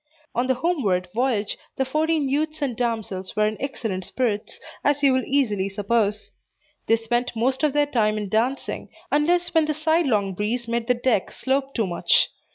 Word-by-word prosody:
On 245 +2 0
the 260 - +2
homeward 240 - 0
voyage, 230 -4 0 0.2
the 265 - +1
fourteen 310 +2 +1
youths 305 +3 -1
and 255 -4 -1
damsels 220 -6 -2
were 215 - +3
in 215 +1 0
excellent 225 -9 -3
spirits, 215 0 -2 0.2
as 290 0 +1
you 275 -2 +6
will 260 0 +1
easily 210 -9 +1
suppose. 205 +1 0 0.6
They 225 - +5
spent 240 +2 -1
most 260 +4 0
of 300 -3 +2
their 295 0 +3
time 215 -6 +1
in 210 -1 -3
dancing, 235 +7 -1 0.2
unless 345 +4 +2
when 320 -2 +4
the 305 -1 -1
sidelong 285 - +1
breeze 225 +5 -2
made 235 0 -1
the 250 - +3
deck 240 -5 +1
slope 270 +1 -1
too 225 - +1
much. 190 - +2
245 Hz, 175 wpm, -24 LUFS, 215-285 Hz, 0.6 s, you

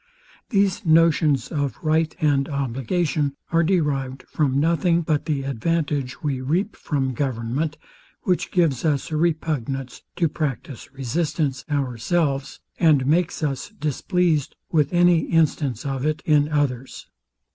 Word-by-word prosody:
These 200 -1 +1
notions 160 -5 +3
of 145 -3 -2
right 160 0 +1
and 145 -3 +2
obligation 140 +2 -1 0.2
are 165 0 +4
derived 145 -7 0
from 140 -3 0
nothing 170 +2 +2
but 155 -2 0
the 145 -3 -1
advantage 140 0 -2
we 140 -4 -1
reap 180 +11 -1
from 135 -3 -2
government, 130 +4 -2 0.5
which 180 -2 0
gives 160 -9 +1
us 150 -1 0
a - - -1
repugnance 150 -5 -1
to 170 - +2
practise 145 -3 -4
resistance 135 0 -2
ourselves, 140 +1 -1 0.2
and 150 -6 +4
makes 160 +3 +1
us 135 -3 -2
displeased 155 +1 0 0.2
with 155 -4 +2
any 175 -1 +5
instance 145 -6 +1
of 135 -2 -2
it 155 +1 -1
in 150 -1 +3
others. 135 -4 -2
150 Hz, 125 wpm, -23 LUFS, 135-165 Hz, 0.5 s, any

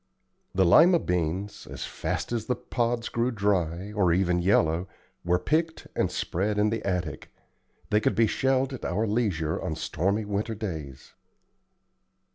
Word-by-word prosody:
The 95 0 +4
Lima 165 - +7
beans, 90 - -2
as - - -5
fast - - -3
as 115 -2 -2
the 125 - +1
pods 120 -1 -1
grew 120 +1 0
dry, 100 -4 -1
or 95 -5 +2
even 90 0 +2
yellow, 85 -1 +2 0.4
were 90 +1 +2
picked 160 - -1
and - - +1
spread 100 +4 -1
in 105 +1 +3
the 115 -1 -2
attic. 90 -6 -3 0.6
They 105 - +4
could - - +1
be 115 - +4
shelled 130 +4 +1
at 130 - -7
our 100 +6 0
leisure 100 -8 0
on 80 - -3
stormy 100 +7 -1
winter 105 +2 -2
days. 80 - -6
100 Hz, 150 wpm, -27 LUFS, 85-115 Hz, 0.6 s, Lima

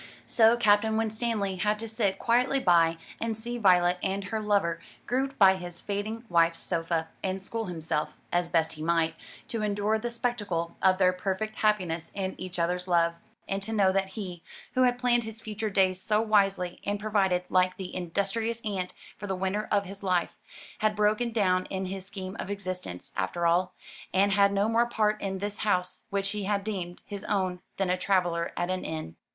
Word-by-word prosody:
So 230 0 +5
Captain 220 -1 +3
Winstanley 220 -3 -1
had 210 +2 +1
to 225 +1 -5
sit 215 -4 0
quietly 250 +5 +2
by, 165 -6 +4 0.2
and 225 -1 -2
see 240 +2 -4
Violet 180 -3 +4
and 195 +1 -1
her 220 - -1
lover 200 -6 +1 0.3
grouped 270 +2 -1
by 190 -2 +7
his 175 -1 -7
fading 210 +3 -3
wife's 170 -2 +3
sofa, 165 -1 -1
and 190 0 -2
school 225 +4 -4
himself, 160 -3 -2 0.2
as 175 0 +2
he - - -18
best 160 -1 +1
might, 165 0 +1 0.3
to 230 - -3
endure 210 +1 +1
the 240 +2 -3
spectacle 210 -8 -2
of 190 -1 +4
their 185 -1 +4
perfect 195 +4 -3
happiness 180 -6 +1
in 190 -1 -2
each 185 0 -5
other's 180 +2 0
love, 170 -1 +3 0.3
and 195 0 -2
to 210 +3 -4
know 195 -3 +4
that 195 0 +1
he 190 -3 -7 0.3
who 255 - +2
had 245 -1 +4
planned 245 -1 +2
his 220 0 -7
future 220 0 -3
days 185 -2 +2
so 210 +1 +2
wisely, 195 -5 +2
and 205 0 -1
provided, 195 -4 +1
like 185 0 +2
the 185 -2 -6
industrious 200 +6 -1
ant, 190 -4 -3 0.2
for 205 - -5
the 190 - -1
winter 190 +3 -1
of 200 -1 +2
his 195 +1 -8
life 180 -3 0 0.4
had 215 -1 +2
broken 215 +3 +2
down 185 -5 +2
in 190 0 -3
his 190 0 -5
scheme 190 -1 -6
of - - -4
existence, 185 - -4
after 175 -1 -1
all, 180 +2 +2 0.4
and 200 +2 +4
had 200 0 +5
no 200 +1 +2
more 230 +1 +3
part 215 -2 +1
in 195 -1 -2
this 205 +1 -4
house 180 -4 0
which 195 -1 0
he 205 -1 -3
had 200 0 0
deemed 185 -4 -4
his 200 -1 -7
own 185 -3 0 0.2
than 195 -2 +1
a - - +3
traveller 175 -3 +1
at 175 +1 0
an 185 0 -2
inn. 155 - -5
195 Hz, 190 wpm, -28 LUFS, 180-215 Hz, 0.4 s, by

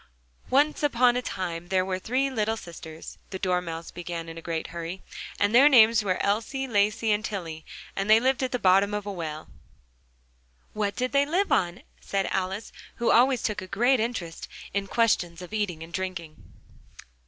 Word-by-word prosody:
"Once 290 +3 +3
upon 250 -4 +3
a 250 - 0
time 175 -6 -4
there 185 0 +1
were 185 -1 -2
three 255 +7 0
little 220 -2 0
sisters," 165 -4 -10
the 190 - -5
Dormouse 180 -3 -2
began 170 -1 -6
in 165 - -8
a 165 - -8
great 165 -1 -3
hurry, 170 +2 -6 0.4
"and 205 +2 +2
their 270 +5 +8
names 230 -4 +6
were 185 -3 0
Elsie, 230 +7 -1
Lacie, 215 0 +1
and 210 +1 +1
Tillie; 165 -7 -5 0.3
and 195 +1 -2
they 220 +1 +8
lived 260 +2 +1
at 260 0 -1
the 250 - 0
bottom 195 0 +3
of 210 -1 -4
a 205 - -3
well 160 -4 -5 0.6
" - - -38
"What 205 -1 -1
did 255 0 -1
they 280 0 +3
live 370 +6 0
on?" 175 -1 +1 0.2
said 195 -1 -1
Alice, 190 +3 -2 0.2
who 235 - +1
always 250 0 +4
took 210 -2 -1
a 185 - -8
great 240 +7 +2
interest 215 -8 -3 0.3
in 200 0 -1
questions 180 -7 +1
of 180 +3 -10
eating 190 -7 -2
and 165 +1 -12
drinking. 175 -3 -6
200 Hz, 185 wpm, -26 LUFS, 170-230 Hz, 0.6 s, their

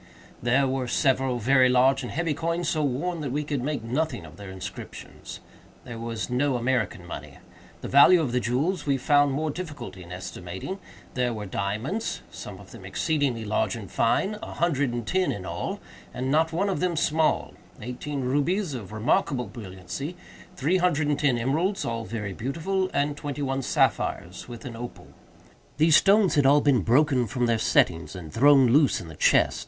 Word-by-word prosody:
There 125 +4 +3
were 130 -1 -2
several 130 0 +1
very 130 +2 +4
large 130 +2 +4
and 125 - -6
heavy 165 0 -1
coins, 165 +3 -1
so 155 -4 0
worn 155 +6 -1
that 140 -4 -3
we 150 +3 -1
could 145 -3 -2
make 145 -1 -2
nothing 150 +8 -2
of - - -13
their 100 -1 -9
inscriptions. 95 0 -9 0.4
There 115 -1 -8
was 115 -1 -4
no 130 +2 +1
American 120 -7 -1
money. 85 - -8 0.4
The - - -5
value 145 +6 +7
of 145 -7 -1
the 125 - +1
jewels 145 +9 -1
we 140 -1 +2
found 145 +2 +3
more 155 +3 -1
difficulty 145 - -7
in 85 0 -12
estimating. 90 - -6 0.3
There 125 -2 0
were 105 -1 -5
diamonds—some 110 - -4
of - - -14
them - - -11
exceedingly 140 -8 -1
large 105 +3 0
and 100 -6 -9
fine—a 210 - 0
hundred 145 -6 +1
and 120 -1 -4
ten 185 +8 +1
in 95 -2 -5
all, - - -4 0.4
and 130 +2 -2
not 160 +2 +3
one 180 +5 0
of 195 - -1
them 180 -2 0
small; 155 +1 +1 0.3
eighteen 130 +5 -5
rubies 145 +7 0
of 105 -6 -7
remarkable 125 +3 +1
brilliancy;—three 140 - -5
hundred 160 -5 +1
and 145 - 0
ten 140 -5 +2
emeralds, 160 - 0
all 115 -1 -3
very 105 -4 -4
beautiful; 170 - -2
and 145 +1 0
twenty 145 -1 -4
one 135 0 -1
sapphires, 90 -7 0
with 120 -2 -9
an 120 -3 -6
opal. 120 +1 -8 0.7
These 155 0 +6
stones 200 -2 +4
had 145 -4 +4
all 145 +2 +6
been 140 -6 +3
broken 125 - +3
from 125 +3 -1
their 115 -1 +1
settings 80 -7 +2
and 85 -4 -9
thrown 135 +2 +6
loose 140 +2 +4
in 85 - -9
the 80 - -9
chest. - - +3
135 Hz, 180 wpm, -26 LUFS, 115-155 Hz, 0.7 s, value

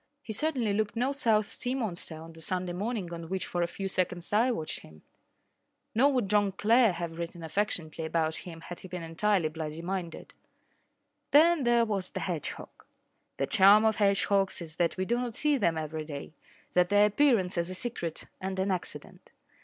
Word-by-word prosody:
He 220 - -5
certainly 245 -4 0
looked 215 +1 -1
no 250 +4 +1
South 220 -6 +1
Sea 250 +1 -3
monster 180 -9 -4
on 165 +1 -11
the 165 - -14
Sunday 180 +2 -3
morning 200 -2 -3
on 165 -1 -7
which 190 0 -2
for 175 - -2
a 170 - +2
few 195 +3 -5
seconds 180 -1 -2
I 230 +5 +4
watched 160 -11 -3
him. 80 0 -16 0.9
Nor 270 +6 +4
would 245 -6 +1
John 205 -1 +2
Clare 225 +2 +4
have 170 -1 -5
written 170 0 -5
affectionately 160 -3 -2
about 160 0 0
him 165 -2 -9
had 175 +1 -8
he - - -10
been 180 -1 -6
entirely 170 +2 +1
bloody 155 +1 -6
minded. 180 -2 -5 1.0
Then 315 -1 +5
there 240 -1 +4
was 200 -4 -2
the - - -5
hedgehog. 170 -6 -5 0.5
The - - +1
charm 205 +3 +6
of 220 -1 +3
hedgehogs 200 -1 +2
is 160 -2 -9
that 170 +1 +1
we 185 - 0
do 240 +4 +1
not 245 -3 -3
see 300 +1 +2
them 170 -6 +2
every 155 0 -3
day 145 0 -7 0.4
that 180 0 +3
their 205 0 +6
appearance 210 -4 +3
is 170 0 0
a 185 - -3
secret 185 -8 -4 0.2
and 190 0 -3
an 190 +1 +1
accident. 180 -2 -6
190 Hz, 190 wpm, -29 LUFS, 170-220 Hz, 1.0 s, charm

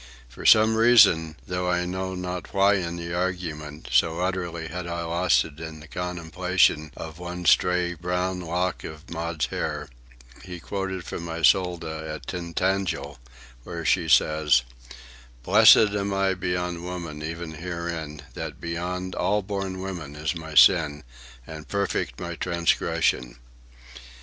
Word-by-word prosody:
For - - -5
some 110 +1 +6
reason, 100 -9 +5
though 90 0 -2
I 90 0 +1
know 95 +1 -3
not 90 +1 -5
why 100 +1 +5
in 85 -2 -3
the 85 0 -5
argument, 85 -5 -4
so 85 +1 +2
utterly 90 -3 -2
had 90 +2 -6
I 85 0 -3
lost 85 -6 +2
it 80 -1 -12
in 80 -1 -7
the 80 - -13
contemplation 90 -2 0
of 80 0 -8
one 90 0 -6
stray 90 0 +3
brown 90 +2 -2
lock 90 +1 -2
of 80 +3 -10
Maud's 85 -2 -2
hair, - - -4 0.5
he 90 -1 -8
quoted 95 -1 -4
from 85 +1 -6
Iseult 85 +1 +2
at 80 -3 -6
Tintagel, 90 -3 -2 0.4
where 85 +2 -6
she 85 -2 +2
says: 75 -5 +4 0.8
"Blessed 105 - +7
am 100 -1 -1
I 95 -1 +2
beyond 90 -1 -3
women 85 -4 -6
even 80 +1 -5
herein, 80 -2 -5
That - - -6
beyond 90 +2 -4
all 105 0 0
born 95 -1 -4
women 85 -7 -6
is 75 +2 -2
my 80 -2 -8
sin, 75 -5 +5 0.4
And 80 -1 -9
perfect 100 0 -2
my 85 -1 -5
transgression." 85 -7 0
85 Hz, 140 wpm, -25 LUFS, 80-90 Hz, 0.8 s, Blessed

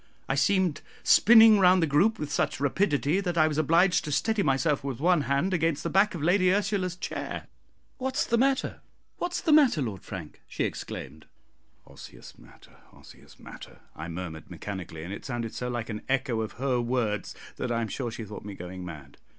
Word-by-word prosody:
I - - 0
seemed 175 +4 +1 0.2
spinning 225 -1 +7
round 185 0 +5
the - - +4
group 170 +10 +2
with 150 -4 -5
such - - -1
rapidity 145 +2 +1
that 175 -3 -2
I 155 -1 +5
was 155 -1 -1
obliged 175 +4 +3
to 150 - -4
steady 220 +8 +1
myself 140 -2 +1
with 135 -4 -4
one 175 +1 +3
hand 145 +8 +1
against 165 -4 0
the - - -3
back 195 0 +3
of 155 - -5
Lady 180 +2 +3
Ursula's 195 -2 0
chair. 180 - -5 0.5
"What's 265 +2 -1
the 235 - +1
matter? 270 +1 0 0.4
what's 350 0 -3
the 320 - +1
matter, 290 - +5
Lord 110 -9 -3
Frank?" 90 -6 -9
she - - -3
exclaimed. 75 +3 -6 0.6
"Osseous - - -13
matter, - - -19
osseous - - -17
matter," - - -12
I 80 - -7
murmured 85 -2 -7
mechanically, 90 -5 -7
and 90 +4 -6
it - - -8
sounded 120 -3 -4
so 125 - -4
like 120 -2 -3
an 105 -1 -5
echo 130 -4 0
of 110 - -5
her 130 -1 -1
words 115 -4 -2 0.2
that 125 - -3
I 115 - 0
am 115 - -2
sure 120 +3 -4
she 115 0 -7
thought 105 0 -9
me 100 -1 -8
going 90 +1 -8
mad. 75 -6 -10
145 Hz, 190 wpm, -27 LUFS, 110-185 Hz, 0.6 s, spinning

